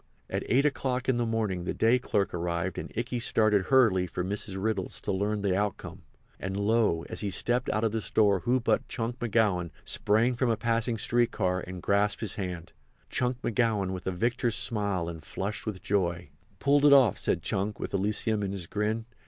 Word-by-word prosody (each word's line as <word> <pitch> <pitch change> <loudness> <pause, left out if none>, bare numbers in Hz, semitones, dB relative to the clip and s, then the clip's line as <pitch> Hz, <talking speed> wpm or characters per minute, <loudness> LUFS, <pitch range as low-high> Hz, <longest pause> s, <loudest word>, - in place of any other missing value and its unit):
At - - -1
eight 135 +4 +3
o'clock 130 -3 -1
in 130 -2 +2
the 120 -1 0
morning 105 -6 -1
the - - -2
day 115 +3 +3
clerk 100 -5 -1
arrived 85 +1 -2
and - - -7
Ikey 120 +1 -2
started 110 -4 +2
hurriedly 110 -9 +4
for 90 +1 -3
Mrs. 95 0 -3
Riddle's 100 -2 -1
to - - -2
learn 100 +2 -1
the 95 -2 +1
outcome. 105 0 -3 0.4
And, 95 +1 -4
lo! 105 -5 +2
as - - -6
he 105 - -1
stepped 120 +7 0
out 110 - 0
of 110 - +2
the 110 0 -2
store 100 -2 +2
who 125 +6 +1
but 120 - 0
Chunk 120 +1 -4
McGowan 105 -7 +1 0.2
sprang 110 +4 +2
from 125 0 +1
a 115 - +1
passing 115 0 0
street 120 +2 +2
car 90 -3 0
and 90 -1 -7
grasped 100 +1 +1
his 110 -4 0
hand—Chunk 95 +7 -5
McGowan 110 -5 +1
with 95 -1 -6
a - - +1
victor's 115 +5 0
smile 100 -6 0
and 85 -2 -6
flushed 100 +8 -5
with 95 -4 -4
joy. 90 -5 -1 0.3
"Pulled 140 +6 +3
it 145 -1 +7
off," 130 -8 +5
said - - 0
Chunk 100 +2 -2
with - - -5
Elysium 105 +2 0
in 100 -1 -2
his 95 -3 -3
grin. 105 +4 -2
105 Hz, 195 wpm, -28 LUFS, 95-115 Hz, 0.4 s, it